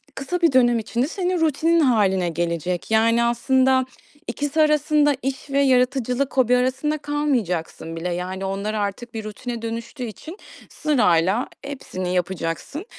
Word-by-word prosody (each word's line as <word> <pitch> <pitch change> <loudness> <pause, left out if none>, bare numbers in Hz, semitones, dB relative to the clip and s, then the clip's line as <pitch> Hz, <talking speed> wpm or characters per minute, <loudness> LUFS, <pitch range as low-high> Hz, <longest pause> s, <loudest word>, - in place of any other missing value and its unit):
kısa 350 +6 -3
bir 335 - +4
dönem 240 -2 +4
içinde 235 +4 -1
senin 360 +1 -1
rutinin 325 +2 +2
hâline 200 - +2
gelecek. 170 +3 -3
Yani, 230 +1 +4
aslında, 260 +2 +2 0.4
ikisi 290 +2 -1
arasında, 300 -1 +3
iş 270 +2 -4
ve 275 0 +1
yaratıcılık, 255 0 +1
hobi 250 -1 +4
arasında 260 +4 0
kalmayacaksın 245 - -2
bile. 175 +2 -3
Yani, 185 +2 -4
onlar 200 +2 -3
artık 215 +3 -3
bir 220 -1 -5
rutine 230 +2 -6
dönüştüğü 230 +2 -5
için 245 - -8 0.3
sırayla 215 - +2 0.2
hepsini 185 -10 -5
yapacaksın. 180 - -3
245 Hz, 135 wpm, -22 LUFS, 195-280 Hz, 0.4 s, bir